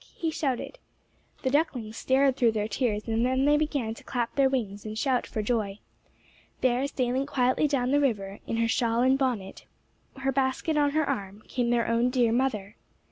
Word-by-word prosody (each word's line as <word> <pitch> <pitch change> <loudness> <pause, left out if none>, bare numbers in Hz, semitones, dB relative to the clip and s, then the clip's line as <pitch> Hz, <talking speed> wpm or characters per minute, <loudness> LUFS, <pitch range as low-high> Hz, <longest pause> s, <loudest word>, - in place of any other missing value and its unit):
he 325 -2 -2
shouted. 305 - -3 0.6
The 260 - +1
ducklings 255 -7 0
stared 265 +2 +2
through 235 -4 +3
their 210 -1 -1
tears, 215 -1 -1
and 225 +1 +1
then 260 +2 +2
they 295 +1 +5
began 290 -7 -1
to - - -14
clap 240 -2 -2
their 275 -1 +3
wings 210 -7 -2
and 215 0 -6
shout 255 0 0
for 215 - -3
joy. 210 -3 -1 0.8
There, 255 +2 +2
sailing 260 0 -1
quietly 260 +1 +2
down 260 -3 0
the 290 - +4
river, 200 -7 -1
in 225 - -2
her 230 0 +2
shawl 230 0 +1
and 260 +1 +4
bonnet, 245 -8 -2 0.5
her 270 0 0
basket 270 +4 0
on 290 -1 +3
her 310 -2 +1
arm, 205 -5 -4
came 245 -2 -1
their 235 -1 +2
own 230 +2 +2
dear 245 -3 +2
mother. 225 -5 -1
250 Hz, 190 wpm, -27 LUFS, 225-270 Hz, 0.8 s, they